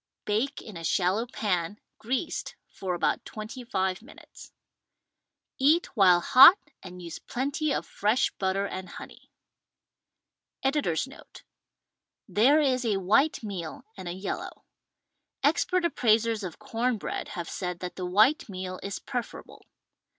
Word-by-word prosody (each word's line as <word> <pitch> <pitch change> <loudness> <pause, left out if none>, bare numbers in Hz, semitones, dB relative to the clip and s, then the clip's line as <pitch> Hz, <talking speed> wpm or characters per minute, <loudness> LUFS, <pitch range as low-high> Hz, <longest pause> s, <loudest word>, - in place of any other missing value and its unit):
Bake 230 +7 -1
in 210 -6 -9
a 165 - -8
shallow 190 +7 +1
pan 200 -5 -2 0.2
(greased) 260 +8 -3 0.2
for 185 -2 -3
about 175 - 0
twenty 215 +4 -8
five 190 -5 -1
minutes. 270 +7 -15 1.1
Eat 300 +5 +3
while 180 -5 +6
hot 270 - +9 0.2
and 180 -1 -10
use 170 -2 -7
plenty 285 +4 -2
of - - -1
fresh 215 +5 +1
butter 195 +1 0
and 185 -2 -6
honey. - - -11 1.3
Editor's 270 - +1
Note: 270 - -15 0.4
— - - -62
There 275 +8 +6
is 260 -4 +1
a 215 -4 +1
white 225 +11 +2
meal 180 -7 -6
and 190 -3 -8
a 175 - -3
yellow. 190 +2 -6 0.8
Ex - - +3
pert 365 -1 0
appraisers 230 -7 +2
of 180 -4 -6
com 240 0 -1
bread - - -4
have 170 -1 -4
said 180 -2 -4
that 180 -1 -5
the 185 - -4
white 220 - +3
meal 185 -1 -6
is 200 0 -4
preferable. 245 -3 -7
215 Hz, 140 wpm, -27 LUFS, 185-255 Hz, 1.3 s, hot